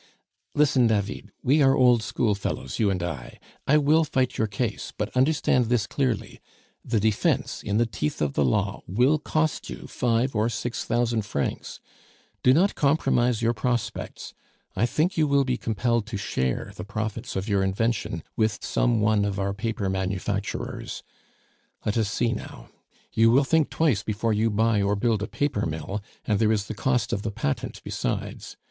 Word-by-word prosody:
"Listen, 135 -4 +4
David, 105 -2 -1
we 145 +4 +4
are 135 -1 +5
old 125 -4 +5
schoolfellows, 100 - -2
you 105 -3 +3
and 90 -3 -1
I; 75 -8 -5 0.3
I 150 - +5
will 150 +2 +4
fight 130 -4 0
your 110 - +1
case; 105 +2 -3
but 105 +3 -3
understand 130 -2 +3
this 115 -2 +1
clearly 130 -2 -2 0.4
the 115 -2 0
defence, 110 0 0
in 100 +1 -1
the 120 - +3
teeth 75 -9 -3
of 75 -2 0
the 75 - +2
law, 65 - 0
will 125 - +3
cost 155 0 -1
you - - -7
five 120 +2 0
or 110 +2 +2
six 115 +2 -3
thousand 115 -1 +1
francs! 85 -9 -3 0.6
Do 125 - +5
not 180 +9 +4
compromise 125 -5 +2
your 115 +1 +3
prospects. 120 -1 -3 0.4
I 110 +5 +2
think 170 +9 0
you 155 -1 +3
will 140 -1 +3
be 125 -1 0
compelled 115 -1 0
to 110 -2 -4
share 65 -9 -2
the 90 - -6
profits 110 +3 -4
of 95 +2 -2
your 100 -2 +2
invention 110 -3 -1
with 110 -1 0
some 120 -3 +1
one 105 -1 +3
of 100 -1 -1
our 100 0 -1
paper 105 0 -2
manufacturers. 95 +1 -3 0.8
Let 105 - 0
us 110 -3 +1
see 115 +2 +1
now. - - -8 0.4
You 115 +1 +5
will 130 +5 +5
think 155 +2 +2
twice 145 -11 +2
before 110 +1 -1
you 110 +2 +2
buy 110 0 +2
or 100 +1 +1
build 110 0 +1
a 105 - -2
paper 135 - -1
mill; 80 +6 -4 0.2
and 105 -4 +1
there 110 -1 +3
is 105 -2 0
the 110 - -5
cost 125 +3 0
of 100 - -1
the 110 - -2
patent 85 -8 -3
besides. - - -4
115 Hz, 175 wpm, -25 LUFS, 100-125 Hz, 0.8 s, are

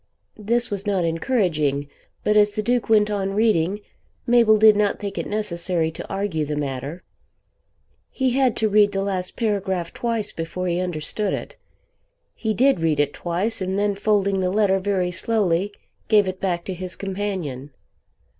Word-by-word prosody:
This 235 +3 0
was 200 0 -4
not 190 -4 +1
encouraging, 165 - 0 0.4
but 210 - +2
as 210 -1 +5
the 215 - -2
Duke 240 +1 0
went 210 -1 +4
on 195 -1 -1
reading, 205 -3 +2 0.4
Mabel 235 -3 +5
did 215 0 +7
not 205 0 +1
think 200 0 -5
it - - -3
necessary 175 -5 -1
to - - -9
argue 195 -5 -1
the 150 0 -3
matter. 145 +3 -4 1.1
He 260 -2 0
had 255 -2 +2
to 220 - +2
read 205 -1 +4
the 195 0 0
last 185 -2 -3
paragraph 190 -6 -1
twice 230 -3 -2
before 165 +3 -4
he 175 0 0
understood 180 +3 -2
it. - - -8 0.8
He 220 -2 -2
did 265 -4 +3
read 160 -3 +1
it 145 -1 +1
twice, 185 +6 -2
and 190 +1 -1
then 205 0 +1
folding 200 -1 +1
the 185 -1 +1
letter 195 -1 +2
very 185 -2 0
slowly 195 -1 0 0.4
gave 210 -3 +4
it 185 0 -4
back 175 -3 -1
to 190 - -3
his 180 0 -5
companion. 185 -9 -4
195 Hz, 165 wpm, -23 LUFS, 175-210 Hz, 1.1 s, did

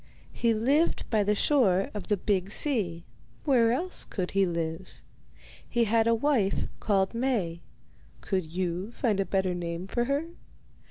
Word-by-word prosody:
He 235 - +1
lived 280 +9 +1
by 215 -2 +3
the 210 +1 +1
shore 200 -8 +3
of 210 - -6
the 205 - +1
big 195 -1 0
sea; 205 - 0 0.4
where 240 -6 +4
else 350 +9 -1
could 185 -3 -4
he 195 -1 +2
live? 170 +1 -4 0.7
He 240 -1 +2
had 225 +1 +2
a 230 - +4
wife 230 -6 +1
called 195 -2 +1
Maie; 225 -9 -1 0.6
could 185 -4 -2
you 180 +4 -3
find 220 -6 0
a 195 - +1
better 190 -2 0
name 170 0 -4
for 240 +5 -1
her? 280 +4 0
205 Hz, 155 wpm, -28 LUFS, 185-240 Hz, 0.7 s, where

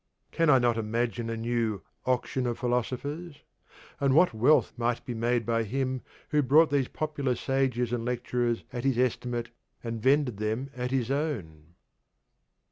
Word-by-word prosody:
Can 165 -1 +2
I 135 - +7
not 120 -2 +2
imagine 115 0 -1
a 115 - -3
new 115 -3 -1 0.2
'Auction 130 0 0
of 120 - -2
Philosophers,' 140 +6 -3 0.6
and 135 -1 +2
what 175 -3 +5
wealth 125 +8 +3
might 120 0 -1
be 125 - -4
made 120 0 0
by 115 -1 +1
him 130 +3 -2 0.3
who 150 -1 +3
bought 150 +4 +5
these 140 -3 +2
popular 145 -5 -2
sages 125 -2 0
and 120 -2 -1
lecturers 120 -1 -1
at 120 - -4
his 135 -3 +1
estimate, 120 -1 -1 0.3
and 115 -1 -4
vended 135 -3 +3
them 110 +6 -2
at 125 0 -2
their 130 0 0
own? 85 - -4
125 Hz, 155 wpm, -28 LUFS, 115-135 Hz, 0.6 s, I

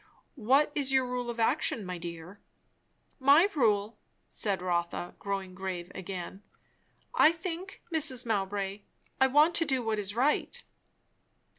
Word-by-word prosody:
"What 270 +7 +3
is 280 -3 0
your 265 -1 +3
rule 250 -1 -3
of 235 0 -5
action, 250 -1 +1
my 180 -1 -5
dear?" 170 +3 -8 0.8
"My 285 +7 +6
rule?" 210 -5 +1 0.3
said 195 -4 -1
Rotha, 175 -1 -2
growing 195 -2 -4
grave 180 -2 -5
again. 190 0 -7 0.7
"I 310 - +6
think, 340 +3 -7
Mrs. 270 -6 +3
Mowbray, 200 -2 -2 0.4
I 265 - +5
want 300 +5 +4
to 330 - +2
do 265 -4 0
what 220 -1 -1
is 205 0 -3
right." 270 +5 0
225 Hz, 135 wpm, -29 LUFS, 190-275 Hz, 0.8 s, My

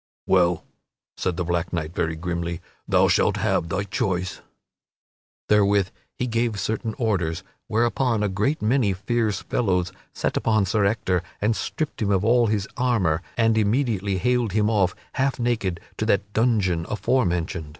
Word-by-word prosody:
"Well," 90 -3 +3 0.5
said 90 -3 -2
the 90 - 0
black 85 -1 -1
knight 85 -2 -3
very 80 -2 -1
grimly, 85 0 -3 0.3
"thou - - +4
shalt - - +2
have 85 - 0
thy 95 +3 -1
choice." 95 -1 -2 1.1
Therewith 100 -2 +3 0.3
he 125 - -1
gave 115 -3 0
certain 110 +2 -2
orders, 95 - -1 0.2
whereupon 115 0 +1
a - - +2
great 105 +9 -1
many 110 -3 +2
fierce 110 +1 -1
fellows 90 -5 0 0.2
set - - -2
upon 110 -3 +2
Sir 105 +1 +1
Ector 95 -4 +1 0.2
and 110 +2 +1
stripped 155 +3 -3
him 105 - +1
of 100 0 +2
all 120 0 +4
his 105 -2 0
armor, 100 -11 +1 0.2
and 115 -1 +3
immediately 105 -3 +1
haled 120 0 +1
him 105 +1 +2
off, 95 -5 +2 0.3
half 135 -1 +1
naked, 115 -8 0 0.2
to 110 - -1
that 100 -1 +1
dungeon 100 -8 +1
aforementioned. 90 - 0
100 Hz, 150 wpm, -24 LUFS, 90-115 Hz, 1.1 s, thou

